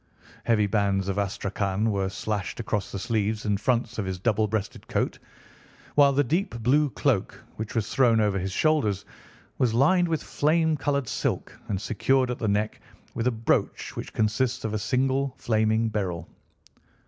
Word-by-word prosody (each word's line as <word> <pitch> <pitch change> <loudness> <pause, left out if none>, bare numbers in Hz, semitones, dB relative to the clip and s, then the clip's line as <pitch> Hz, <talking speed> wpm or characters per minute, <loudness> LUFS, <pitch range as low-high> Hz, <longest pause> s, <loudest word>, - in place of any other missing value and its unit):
Heavy 110 -3 +3
bands 100 -2 +1
of 100 +1 -1
astrakhan 100 +1 -1
were 100 -1 0
slashed 100 +1 -3
across 105 -3 -2
the - - -4
sleeves 110 0 -1
and 100 -2 0
fronts 120 -2 0
of 100 - -1
his 95 -1 -3
double 110 +2 +1
breasted 105 -1 -4
coat, - - -1 0.7
while 140 -1 +6
the 140 +1 +3
deep 155 - -1
blue 145 +5 +3
cloak 130 -6 0 0.2
which 110 +2 -5
was 110 -2 0
thrown 120 -4 +3
over 105 -2 +2
his 95 +1 -3
shoulders 110 -7 +1 0.5
was 120 -3 +2
lined 175 +8 +4
with 160 -3 -1
flame 160 +1 +2
coloured 140 -2 -1
silk - - -2
and 100 -3 -1
secured 125 +4 +1
at 125 - -4
the 110 - -1
neck 105 +1 0 0.3
with 115 +1 -1
a - - +3
brooch 115 -1 -1
which - - -6
consisted 115 +3 0
of 110 - -4
a 110 - 0
single 130 +4 0
flaming 110 0 +1
beryl. 95 -6 -3
110 Hz, 170 wpm, -26 LUFS, 100-130 Hz, 0.7 s, while